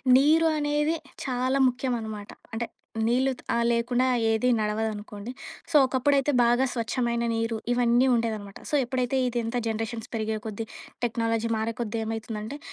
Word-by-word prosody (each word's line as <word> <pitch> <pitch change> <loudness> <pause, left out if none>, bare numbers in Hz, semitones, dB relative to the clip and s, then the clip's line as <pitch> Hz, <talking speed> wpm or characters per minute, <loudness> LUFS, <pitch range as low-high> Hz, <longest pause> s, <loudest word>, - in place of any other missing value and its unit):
నీరు 310 +5 +5
అనేది 295 +2 +1 0.3
చాలా 255 +1 +1
ముఖ్యమనమాట. 230 -5 -3 0.2
అంటే 230 +1 -2 0.4
నీళ్ళు 260 +3 +3
త్ - - -11
ఆ - - +2
లేకుండా 240 +2 +1 0.2
ఏది 225 +2 +2
నడవదనుకోండి. 210 0 -3 0.4
సో, - - -2
ఒకప్పుడైతే 275 +2 +2
బాగా 240 +2 +4
స్వచ్ఛమైన 235 0 -1
నీరు, 225 0 -1 0.2
ఇవన్నీ 245 +1 +4
ఉండేదనమాట 220 -4 -2
సో - - +1
ఎప్పుడైతే 255 +1 -1
ఇదంతా 240 0 -1
జనరేషన్స్ 225 +1 -3
పెరిగే 220 -1 -1
కొద్దీ, 220 +1 -4 0.4
టెక్నాలజీ 230 -1 0
మారే 220 +1 -1
కొద్దీ, 230 -1 -2
ఏమైతుందంటే 220 +3 -4
235 Hz, 130 wpm, -27 LUFS, 220-255 Hz, 0.4 s, నీరు